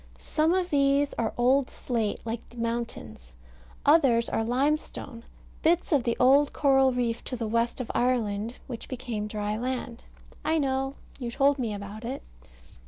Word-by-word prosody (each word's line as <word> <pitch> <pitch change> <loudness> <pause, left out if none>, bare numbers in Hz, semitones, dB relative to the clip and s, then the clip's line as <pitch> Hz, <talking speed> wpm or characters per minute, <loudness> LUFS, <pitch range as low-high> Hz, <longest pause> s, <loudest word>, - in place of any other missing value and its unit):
Some 320 +3 +1
of 365 -1 -1
these 280 0 +3
are 225 -2 -1
old 255 +2 +3
slate, 225 -4 -2
like 230 0 -3
the 240 - -16
mountains; 230 - -4 0.5
others 270 -7 +5
are 225 - 0
limestone; 265 -1 -1 0.4
bits 340 +2 +2
of 280 -6 +3
the 235 - 0
old 280 +3 +5
coral 270 -2 +4
reef 240 -2 -1
to 255 - -3
the 235 -2 -3
west 230 +3 0
of 250 - -3
Ireland 230 -2 0
which 235 -3 -7
became 240 -5 -4
dry 210 0 -2
land. 245 -1 -4 0.4
I 320 - +2
know. 270 -1 0 0.2
You 245 -3 -3
told 275 +3 +2
me 235 -4 -1
about 205 +2 -7
it. 255 +4 -5
245 Hz, 160 wpm, -27 LUFS, 230-275 Hz, 0.5 s, others